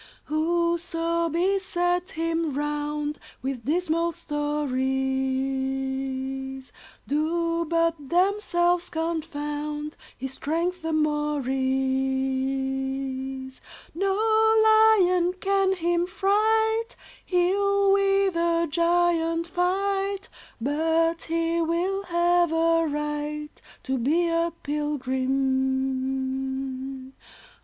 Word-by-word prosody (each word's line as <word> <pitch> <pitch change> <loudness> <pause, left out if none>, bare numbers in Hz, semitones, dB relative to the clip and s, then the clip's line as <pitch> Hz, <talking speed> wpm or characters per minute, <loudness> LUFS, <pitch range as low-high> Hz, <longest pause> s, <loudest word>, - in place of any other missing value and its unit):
"Whoso 335 +1 0
beset 355 0 0
him 330 -2 -1
round 295 0 -2 0.2
With 260 -3 -4
dismal 335 +2 0
stories, 265 -2 -2 0.3
Do 335 +3 0
but 330 -3 0
themselves 355 -2 +2
confound 300 -2 -3 0.2
His 265 +1 -5
strength 340 +6 -2
the 325 0 -2
more 300 -2 0
is. 265 0 -1 0.3
No 385 +3 0 0.5
lion 415 -5 +5
can 385 +1 +1
him 345 0 0
fright; 440 +4 +1 0.3
He'll 395 +2 +2
with 395 -1 +2
a 335 0 +2
giant 335 0 +2
fight, 390 +3 -1 0.3
But 325 +5 +1
he 330 0 0
will 360 +4 -1
have 345 -1 +2
a 330 0 +3
right 295 0 -4 0.2
To 265 -1 -1
be 325 +8 +2
a 335 0 +1
pilgrim. 265 -1 -1
320 Hz, 80 wpm, -25 LUFS, 270-345 Hz, 0.5 s, lion